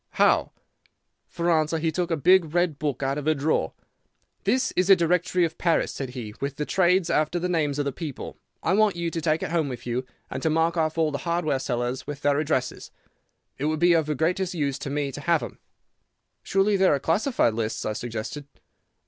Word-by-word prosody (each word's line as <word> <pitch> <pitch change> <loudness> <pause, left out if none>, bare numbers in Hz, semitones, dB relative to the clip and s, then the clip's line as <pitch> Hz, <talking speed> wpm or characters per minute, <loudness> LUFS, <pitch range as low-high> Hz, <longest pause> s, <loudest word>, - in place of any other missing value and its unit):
"'How?' - - +3 0.8
"For 170 0 -1
answer, 155 0 +2
he 160 0 0
took 175 +2 -2
a 165 - 0
big 170 +1 +4
red 175 -4 +1
book 145 -3 -2
out 135 +2 0
of 145 - -6
a 155 - +3
drawer. 150 +2 0 0.7
"'This 260 0 +2
is 185 +1 +1
a 195 - +10
directory 180 +1 +2
of 165 - -6
Paris,' 170 -2 +1
said 135 -2 -5
he, 110 -4 -6
'with 140 0 -2
the 150 - -3
trades 180 0 +2
after 155 +3 +1
the 175 +1 -1
names 155 -5 0
of 145 - 0
the 140 - -1
people. 150 -2 -7 0.2
I 165 - +2
want 210 -1 +3
you 170 -1 -2
to 165 - -3
take 155 0 +1
it - - -3
home 160 -4 +1
with 125 -1 -7
you, 125 +1 -2 0.3
and - - -4
to 160 - +1
mark 165 +2 +2
off 160 -1 0
all 160 -2 +2
the 140 - -3
hardware 170 -5 0
sellers, 125 0 -3
with 145 -1 -6
their 145 0 +3
addresses. 145 -4 -2 0.7
It 140 - -1
would 155 0 0
be 175 +1 +5
of 160 -2 +2
the 150 - -1
greatest 180 +5 0
use 140 -3 -1
to - - -5
me 140 0 -2
to 145 - -7
have 170 0 +2
them.' - - -8 0.8
"'Surely 195 +1 +2
there 190 -6 +4
are - - -2
classified 170 - +1
lists?' 110 0 -3
I 110 - -1
suggested. 120 +5 -5
155 Hz, 215 wpm, -25 LUFS, 140-175 Hz, 0.8 s, a